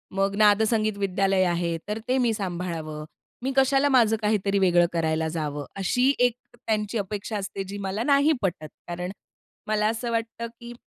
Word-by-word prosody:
मग 195 0 +1
नादसंगीत 215 0 +3
विद्यालय 195 -1 +1
आहे. 170 -1 0
तर 210 +1 -3
ते 255 +1 +2
मी 240 -3 +2
सांभाळावं. 170 -6 -4 0.4
मी 270 - 0
कशाला 270 +1 +4
माझं 235 -5 +4
काहीतरी 205 -2 +1
वेगळं 175 -2 +4
करायला 160 -1 0
जावं. 150 -2 -3
अशी 250 +8 +2
एक 245 -1 +4 0.3
त्यांची 215 0 0
अपेक्षा 205 +1 -3
असते, 195 0 -4
जी 195 +1 -7
मला 195 +4 -2
नाही 280 +3 +4
पटत. 170 -6 -2 0.2
कारण 180 +2 -4 0.6
मला 215 0 +2
असं 230 +2 -2
वाटतं 230 0 -3
की 235 0 -9
205 Hz, 160 wpm, -25 LUFS, 180-230 Hz, 0.6 s, कशाला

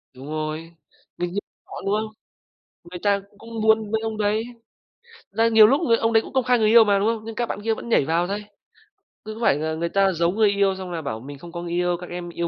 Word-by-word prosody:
Đúng 130 +2 -10
rồi, 155 +2 -4 0.5
mình 175 0 -2
như 205 - 0 0.3
họ, - - -9
đúng 195 - +1
không? 215 0 -2 0.8
Người 180 +1 -8
ta 200 -1 +2 0.2
cũng 230 0 -7
muốn 220 -1 +3
với 220 - 0
ông 220 -1 -4
đấy, 215 +1 +1 0.9
là 225 +3 +2
nhiều 220 -2 +7
lúc 275 +8 +2
người 230 -7 +3
ông 225 0 0
đấy 225 - +5
cũng - - -11
công 260 -1 +2
khai 250 -1 +2
người 215 - +3
yêu 230 +1 +8
mà, 200 -2 +2
đúng 205 - +1
không? 225 -1 -1
Nhưng 225 0 -7
các 240 - -1
bạn 205 - -5
kia 225 +1 0
vẫn 235 - -7
nhảy 185 - +3
vào 170 +3 +1
thây, 205 +2 -3 0.8
cứ 215 - -6
có - - -10
phải 225 - +4
là 160 +1 -2
người 170 +1 -2
ta 195 +1 +3
giấu 170 +1 +1
người 215 +1 +3
yêu, 200 -1 +2
xong 190 -1 -7
là 165 -2 -3
bảo 110 -7 -4
mình 140 +4 -10
không 170 +4 -11
có 170 0 -6
người 175 -1 -6
yêu, 175 0 +1
các 180 - -8
em 175 0 -6
yêu 170 0 -3
200 Hz, 270 wpm, -23 LUFS, 170-220 Hz, 0.9 s, yêu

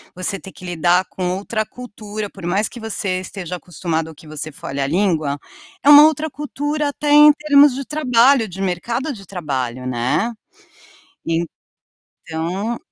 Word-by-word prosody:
você 195 +2 -2
ter 190 - -11
que 185 - -13
lidar 175 +1 +2
com 180 -1 -3
outra 215 +2 -2
cultura. 215 -3 -7
Por 190 -3 -11
mais 195 +5 +1
que 240 - -10
você 200 -4 -2
esteja 185 -1 -6
acostumado 165 -1 -3
ou 160 - -12
que 155 - -16
você 155 0 -5
fale 140 -1 -5
a 135 - 0
língua, 160 -4 0 0.5
é 285 - +5
uma 295 0 +11
outra 315 0 +1
cultura 295 +1 -3
até 290 +1 -2
em 295 +1 +9
termos 290 -2 +5
de 275 +1 -5
trabalho, 255 -4 +3
de 190 0 -8
mercado 235 - -2
de 200 -5 -11
trabalho, 130 -9 -4
né, 125 - 0 1.8
então, 180 +8 -4
195 Hz, 160 wpm, -19 LUFS, 170-265 Hz, 1.8 s, uma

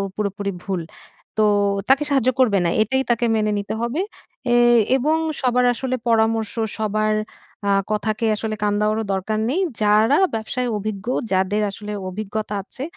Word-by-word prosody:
পুরোপুরি 200 -1 -2
ভুল। 190 -3 -2 0.6
তো 215 - +4 0.5
তাকে 275 +2 +5
সাহায্য 265 -3 +3
করবে 220 -6 +4
না, - - +2
এটাই 265 +5 +1
তাকে 235 0 +1
মেনে 215 -1 +1
নিতে 200 - -4
হবে। 240 +8 -1 0.5
এয় 240 0 +5 0.2
এবং 305 +5 +2 0.2
সবার 250 -1 +2
আসলে 255 +1 -2
পরামর্শ, 225 -1 +2 0.2
সবার 215 0 0 0.5
আ - - +2 0.2
কথাকে 215 +1 -1
আসলে 215 0 -3
কান 205 0 +2
দেওয়ারও 215 +1 +1
দরকার 205 +3 -1
নেই। 330 +8 0 0.2
যারা 215 +6 +4 0.2
ব্যবসায় 235 +3 -2
অভিজ্ঞ, 205 0 -5 0.3
যাদের 190 +3 +1
আসলে 210 +1 -8 0.2
অভিজ্ঞতা 210 +2 -4
আছে 260 +6 -8
215 Hz, 150 wpm, -21 LUFS, 210-240 Hz, 0.6 s, তাকে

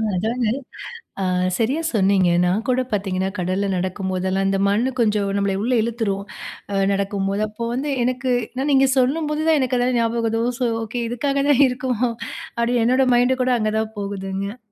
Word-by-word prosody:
அஜனா, 220 +3 0 0.7
ஆ - - 0 0.3
சரியா 265 +8 0
சொன்னீங்க. 195 -3 +3 0.2
நான் 190 +5 +1
கூடப் 255 0 0
பார்த்தீங்கனா, 190 -2 -1
கடல்ல 185 +3 -1
நடக்கும்போதெல்லாம், 185 +1 -1
இந்த 195 0 +1
மண்ணு 225 +6 +2
கொஞ்சம் 210 -3 +1
நம்லைய 200 -1 0
உள்ள 250 +2 +1
இழுத்துரும் 215 -4 -2 0.5
அ - - 0 0.2
நடக்கும்போது. 200 +1 -1
அப்போ 215 +2 -7
வந்து 280 +3 -2
எனக்கு, 255 +1 -1 0.3
நான் 290 +2 0
நீங்க 270 0 +5
சொல்லும்போது 300 +4 +1
தான் 315 - +5
எனக்கு 255 -1 0
அதெல்லாம் 245 0 +1
ஞாபகவது. 230 -1 0
ஒ - - +1
சோ 245 - +1 0.2
ஓகே 235 +2 -4
இதுக்காகதா 275 +3 +1
இருக்கோ 250 +1 -3 0.7
அப்டி 240 +1 +1
என்னோட 255 +2 +3
மைண்ட் 250 +2 +2
கூட 255 - +1
அங்க 215 0 0
தான் 220 0 -3
போகுதுங்க. 200 +2 -4
225 Hz, 160 wpm, -21 LUFS, 195-255 Hz, 0.7 s, நீங்க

